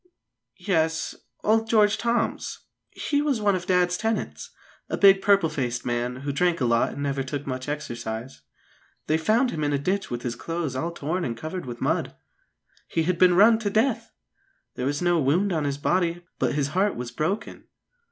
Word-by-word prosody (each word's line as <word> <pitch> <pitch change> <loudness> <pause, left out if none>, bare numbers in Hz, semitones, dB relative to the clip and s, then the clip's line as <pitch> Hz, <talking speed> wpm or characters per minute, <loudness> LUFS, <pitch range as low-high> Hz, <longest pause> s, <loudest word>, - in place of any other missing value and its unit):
"Yes; 160 -5 0 0.3
old 225 +1 +2
George 215 -1 +4
Toms. 235 0 -1 0.3
He 290 -1 -1
was 290 -5 0
one 205 -1 +2
of 180 0 -4
Dad's 180 -1 +2
tenants, 225 -1 -2 0.4
a - - -2
big 195 -1 +6
purple 200 -4 +4
faced 120 -5 -3
man, 120 +1 -1
who 140 0 -2
drank 175 +3 +1
a 130 - +1
lot 115 -1 +2
and 140 - -5
never 140 -1 -1
took 140 +2 -4
much 130 +1 -4
exercise. 120 -4 -5 0.6
They 155 +1 +1
found 230 +9 +2
him 155 - -3
in 145 0 0
a - - +2
ditch 190 +7 -1
with 120 -1 -4
his 120 -1 -3
clothes 165 0 -4
all 160 +6 -1
torn 170 +2 -3
and 115 -5 -3
covered 160 +3 -5
with 120 -1 -7
mud. - - -1 0.7
He 165 - 0
had 175 +1 0
been 180 -1 +6
run 220 +4 +6
to 215 -3 -1
death; 225 +2 0 0.6
there 125 - -3
was 145 +4 -1
no 175 -1 +3
wound 175 +8 +2
on 155 -3 0
his 140 -1 -1
body, 175 +2 0
but - - +1
his 140 -2 0
heart 190 +6 +1
was 120 -1 -5
broken." 170 - -3
165 Hz, 190 wpm, -25 LUFS, 140-200 Hz, 0.7 s, big